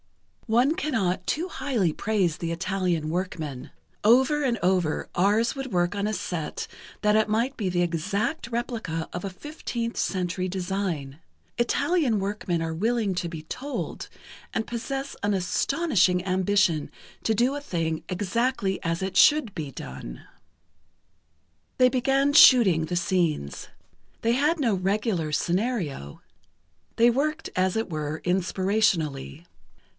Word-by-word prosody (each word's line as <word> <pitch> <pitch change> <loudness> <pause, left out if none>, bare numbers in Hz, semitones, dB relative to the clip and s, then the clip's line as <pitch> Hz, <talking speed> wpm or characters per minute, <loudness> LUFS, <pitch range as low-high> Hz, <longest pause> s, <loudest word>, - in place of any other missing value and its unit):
"One 245 +7 +3
cannot 195 - -1
too 335 +5 0
highly 255 - -1
praise 195 -6 0
the 170 -1 -3
Italian 180 -3 -1
workmen. 160 -6 -4 0.3
Over 265 +7 +4
and 245 -4 +1
over, 180 -4 +1
ours 210 +7 +2
would 270 -1 -5
work 175 +1 +1
on 200 +1 -1
a - - 0
set 180 -5 -4 0.4
that 210 0 +4
it 215 -1 +3
might 235 +5 0
be 200 -5 -2
the 175 0 +1
exact 200 - -1
replica 230 -9 -3
of 175 - -4
a 195 - -3
15th 235 - -5
Century 185 0 -1
design. 175 -6 -3 0.4
Italian 280 - +1
workmen 195 -4 -2
are 160 0 -2
willing 220 +3 0
to 175 -1 -2
be 160 -2 -7
told, 270 - -5 0.4
and 225 - -1
possess 270 +4 -4
an 205 0 +2
astonishing 185 - +1
ambition 185 -4 +1 0.3
to 220 - +2
do 245 +6 +2
a 290 - -4
thing 165 - -2
exactly 205 +2 -1
as 165 +1 -1
it 190 0 -3
should 295 -9 +5
be 150 -4 -4
done." 65 - -8 1.5
They 255 -1 +6
began 270 +2 +2
"shooting" 210 - +7
the 175 +2 -2
scenes. 170 - -1 0.5
They 230 +1 +3
had 300 +6 +2
no 235 -7 +2
regular 190 -3 0
scenario. 170 - -2 0.8
They 235 +1 +6
worked, 305 +5 -1
as 185 +2 +1
it 225 - -1
were, 155 -1 -3
inspirationally. 180 -5 0
195 Hz, 135 wpm, -26 LUFS, 175-240 Hz, 1.5 s, shooting